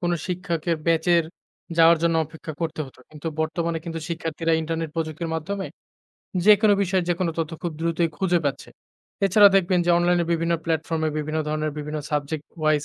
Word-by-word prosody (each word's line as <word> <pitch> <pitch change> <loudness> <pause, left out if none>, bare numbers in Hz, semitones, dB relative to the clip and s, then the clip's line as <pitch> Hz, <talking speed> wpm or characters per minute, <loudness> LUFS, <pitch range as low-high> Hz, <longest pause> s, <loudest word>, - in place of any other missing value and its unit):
কোনো 175 -1 +1
শিক্ষকের 170 -2 -2
ব্যাচের 165 +1 +3 0.5
যাওয়ার 165 0 +6
জন্য 165 -1 +2
অপেক্ষা 160 0 -9
করতে 160 -1 -3
হতো। 130 - -17
কিন্তু 155 +1 -10
বর্তমানে 165 +1 -1
কিন্তু 165 -1 -4
শিক্ষার্থীরা 165 0 -2
ইন্টারনেট 160 0 -3
প্রযুক্তির 160 +1 -3
মাধ্যমে 190 +5 -3 0.8
যেকোনো 210 0 +6
বিষয়ে 185 -2 0
যেকোনো 175 -1 0
তথ্য 160 -1 -1
খুব 170 -2 -2
দ্রুতই 165 0 +1
খুঁজে 180 -2 +2
পাচ্ছে। 140 - -2 0.6
এছাড়াও 205 +1 +7
দেখবেন 185 -1 +2
যে - - +4
অনলাইনে 175 0 +2
বিভিন্ন 170 0 0
প্ল্যাটফর্মে 160 -1 -1
বিভিন্ন 155 +1 -2
ধরনের 155 0 -1
বিভিন্ন 150 +1 -4
সাবজেক্ট 150 +1 -2
ওয়াইস 155 -1 +2
165 Hz, 160 wpm, -24 LUFS, 155-175 Hz, 0.8 s, এছাড়াও